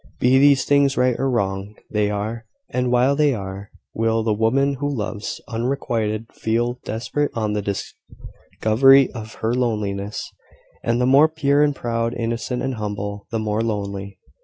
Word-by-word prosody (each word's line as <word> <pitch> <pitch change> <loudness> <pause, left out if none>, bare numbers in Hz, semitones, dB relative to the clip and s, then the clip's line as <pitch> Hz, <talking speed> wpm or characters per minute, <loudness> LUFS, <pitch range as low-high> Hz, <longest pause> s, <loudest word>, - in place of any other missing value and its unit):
Be 130 +2 +4
these 140 -2 +5
things 140 -1 +3
right 125 -1 +3
or 135 +1 +1
wrong, 100 -3 -2 0.2
they 105 -1 +1
are: 110 +3 -4 0.2
and 125 -1 0
while 125 +3 +3
they 145 -2 +3
are, 100 0 -7 0.2
will 115 0 +1
the 110 -1 +1
woman 130 +6 +2
who 145 0 -1
loves, 105 -5 -4
unrequited, 115 -3 -2
feel 120 +2 -1
desperate 135 +6 -2
on 110 -2 -1
the 105 - -1
discovery 115 +5 +1
of 110 -2 -8
her 110 +2 -1
loneliness 105 -5 -2 0.5
and, 115 +1 +1
the 125 - +2
more 140 +5 +6
pure 145 -2 +2
and 145 -1 +3
proud, 115 -1 -2
innocent 115 +2 -2
and 135 - -1
humble, 105 -1 -4
the 115 - -2
more 110 0 -1
lonely. 100 -3 -3
115 Hz, 160 wpm, -22 LUFS, 105-130 Hz, 0.5 s, more